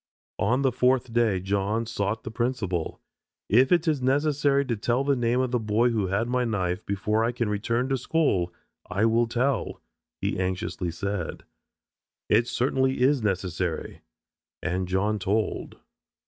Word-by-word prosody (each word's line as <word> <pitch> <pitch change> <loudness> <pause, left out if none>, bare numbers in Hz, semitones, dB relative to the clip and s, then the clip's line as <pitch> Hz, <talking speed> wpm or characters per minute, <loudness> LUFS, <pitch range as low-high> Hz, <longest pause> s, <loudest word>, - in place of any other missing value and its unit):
On 125 +7 +2
the 135 - +3
fourth 125 -1 +1
day 115 -5 +2
John 100 +4 -1
sought 110 -1 -2
the - - -6
principal. 110 -8 -2 0.5
"If 125 +6 +4
it 175 -1 +3
is 150 -4 +1
necessary 140 +1 +2
to 120 -3 -1
tell 120 +5 0
the 140 0 +2
name 120 0 +1
of 130 -1 0
the 125 - +1
boy 110 +2 +2
who 105 -4 0
had 100 +5 0
my 125 0 +1
knife 95 -4 -1
before 105 +3 0
I 115 - +1
can 120 -2 -2
return 115 +4 0
to 135 -1 0
school, 115 - +1 0.4
I 95 +4 +1
will 115 +1 +3
tell," 125 +1 -1 0.4
he - - -2
anxiously 95 -1 -2
said. 100 +1 -4 0.9
"It 115 +3 +4
certainly 130 +2 +1
is 135 +1 +4
necessary." 90 -4 -2 0.6
And 90 0 -1
John 100 +3 0
told. 105 +3 -1
115 Hz, 155 wpm, -26 LUFS, 100-125 Hz, 0.9 s, If